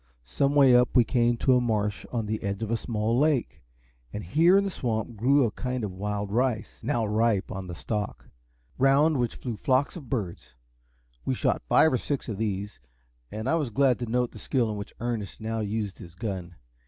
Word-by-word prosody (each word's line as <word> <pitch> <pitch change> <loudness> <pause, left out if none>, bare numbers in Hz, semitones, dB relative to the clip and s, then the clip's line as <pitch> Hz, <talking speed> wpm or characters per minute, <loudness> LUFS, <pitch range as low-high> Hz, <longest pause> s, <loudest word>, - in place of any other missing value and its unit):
Some 140 - 0
way 135 -3 +7
up 125 0 +3
we 125 - +7
came 120 0 +1
to 130 +2 +3
a 125 - +3
marsh 105 -4 -1
on 115 -3 -1
the 110 +1 -3
edge 100 +2 -3
of 110 - -3
a - - +3
small 115 0 -1
lake, 150 -3 +1 0.5
and 105 - -5
here 165 - +4
in 200 - +3
the 195 - -2
swamp 115 -5 -3
grew 135 +6 +3
a 110 - -1
kind 125 0 -3
of 105 - -3
wild 100 +1 -3
rice, 120 -1 -1
now 120 -2 0
ripe 110 -1 +1
on 95 -1 -5
the 90 - -6
stalk, 105 +3 -4 0.5
round 140 +3 +4
which 120 -2 -1
flew 120 -3 -5
flocks 130 +6 +1
of 145 -9 -9
birds. 95 - -4 0.7
We - - -1
shot - - 0
five 160 - +5
or 125 - +2
six 140 -2 -3
of 105 -4 -4
these, 105 -1 -3 0.5
and 110 +1 -4
I - - +2
was 155 -6 0
glad 130 +1 +2
to 120 - -3
note 125 +1 0
the - - -11
skill 120 -4 0
with 105 - -3
which 100 - -7
Ernest 115 -5 -4
now 110 0 -3
used 105 -2 -3
his 85 0 -11
gun. 95 -4 -5
115 Hz, 210 wpm, -27 LUFS, 105-130 Hz, 0.7 s, way